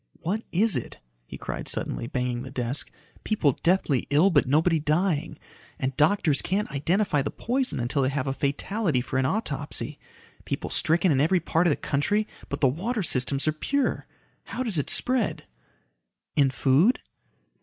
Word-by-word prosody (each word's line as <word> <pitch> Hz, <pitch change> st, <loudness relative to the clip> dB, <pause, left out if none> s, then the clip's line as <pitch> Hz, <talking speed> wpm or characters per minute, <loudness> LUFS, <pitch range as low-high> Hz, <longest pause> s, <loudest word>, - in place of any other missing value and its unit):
"What 200 Hz, +7 st, -1 dB
is 210 Hz, +4 st, +3 dB
it?" -, -, -4 dB, 0.3 s
he -, -, -8 dB
cried -, -, -6 dB
suddenly, -, -, -3 dB
banging 125 Hz, -1 st, -2 dB
the 130 Hz, -, -7 dB
desk. 130 Hz, +1 st, -2 dB, 0.3 s
"People 190 Hz, -10 st, +2 dB
deathly 165 Hz, -7 st, +1 dB
ill, 155 Hz, +8 st, +4 dB
but 145 Hz, -5 st, +3 dB
nobody 160 Hz, +4 st, +3 dB
dying. 155 Hz, 0 st, 0 dB, 0.4 s
And 130 Hz, -1 st, -2 dB
doctors 155 Hz, -1 st, +3 dB
can't 200 Hz, +3 st, -1 dB
identify 155 Hz, +3 st, +1 dB
the 135 Hz, -, -2 dB
poison 255 Hz, -, -2 dB
until 120 Hz, +4 st, 0 dB
they 130 Hz, -, +2 dB
have 135 Hz, -2 st, -2 dB
a 135 Hz, -, -1 dB
fatality 150 Hz, -, -1 dB
for 130 Hz, +1 st, -2 dB
an 130 Hz, -, +2 dB
autopsy. 220 Hz, +9 st, -2 dB, 0.4 s
People -, -, -4 dB
stricken 170 Hz, +2 st, +3 dB
in 135 Hz, -2 st, +3 dB
every 175 Hz, +5 st, +3 dB
part 170 Hz, +1 st, +1 dB
of -, -, +4 dB
the -, -, 0 dB
country, 205 Hz, +10 st, 0 dB, 0.2 s
but 140 Hz, -, -4 dB
the 135 Hz, -, +5 dB
water 200 Hz, -, -2 dB
systems 135 Hz, -1 st, +2 dB
are -, -, +4 dB
pure. 275 Hz, -, -1 dB, 0.4 s
How 255 Hz, -, -4 dB
does 210 Hz, -10 st, 0 dB
it 140 Hz, -, -2 dB
spread?" 255 Hz, -4 st, +1 dB, 0.9 s
"In 140 Hz, -2 st, +4 dB
food?" 140 Hz, -, +3 dB
155 Hz, 165 wpm, -26 LUFS, 135-195 Hz, 0.9 s, the